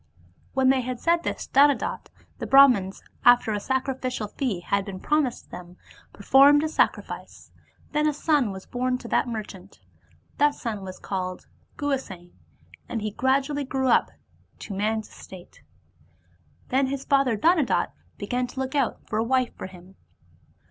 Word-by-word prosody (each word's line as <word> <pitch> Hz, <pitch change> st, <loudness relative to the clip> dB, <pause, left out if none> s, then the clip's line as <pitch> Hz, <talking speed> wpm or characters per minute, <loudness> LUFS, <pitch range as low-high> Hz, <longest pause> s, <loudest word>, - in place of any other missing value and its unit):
When 265 Hz, -1 st, +3 dB
they 265 Hz, -1 st, +3 dB
had 250 Hz, 0 st, -5 dB
said 340 Hz, 0 st, +2 dB
this -, -, -4 dB
to -, -, -26 dB
Dhanadatta, 285 Hz, 0 st, +3 dB, 0.3 s
the -, -, -4 dB
Brahmans, 250 Hz, -9 st, +5 dB, 0.2 s
after 245 Hz, -2 st, +5 dB
a 205 Hz, -, -1 dB
sacrificial 260 Hz, -2 st, -2 dB
fee 220 Hz, -10 st, -3 dB
had 200 Hz, +3 st, 0 dB
been 195 Hz, -2 st, -7 dB
promised 295 Hz, -2 st, -1 dB
them, 180 Hz, 0 st, -10 dB, 0.3 s
performed 280 Hz, +7 st, +5 dB
a 315 Hz, -, -1 dB
sacrifice: -, -, -2 dB, 0.4 s
then 300 Hz, 0 st, +1 dB
a -, -, +3 dB
son 295 Hz, -6 st, +1 dB
was 190 Hz, -1 st, -8 dB
bom 250 Hz, 0 st, -1 dB
to 245 Hz, -, -10 dB
that -, -, +1 dB
merchant. 205 Hz, -4 st, -8 dB, 0.6 s
That 290 Hz, 0 st, +3 dB
son 220 Hz, -4 st, -5 dB
was 185 Hz, -1 st, -8 dB
called 185 Hz, -2 st, -5 dB, 0.3 s
Guhasena, 255 Hz, -, -4 dB, 0.6 s
and 225 Hz, -3 st, -3 dB
he 215 Hz, -, -2 dB
gradually 275 Hz, +5 st, 0 dB
grew 265 Hz, -1 st, -1 dB
up 235 Hz, -, +3 dB, 0.5 s
to 205 Hz, -, -7 dB
man's 215 Hz, +2 st, -1 dB
estate. 185 Hz, -2 st, -14 dB, 1.1 s
Then 265 Hz, +1 st, +2 dB
his 275 Hz, 0 st, -4 dB
father 275 Hz, -5 st, +2 dB
Dhanadatta 320 Hz, -, +2 dB, 0.3 s
began 250 Hz, 0 st, -2 dB
to 260 Hz, -, -9 dB
look 265 Hz, +1 st, -3 dB
out 275 Hz, -5 st, -1 dB
for 215 Hz, -, -2 dB
a -, -, +2 dB
wife 255 Hz, +1 st, 0 dB
for -, -, -7 dB
him. 185 Hz, +1 st, -16 dB
250 Hz, 155 wpm, -25 LUFS, 205-275 Hz, 1.1 s, Brahmans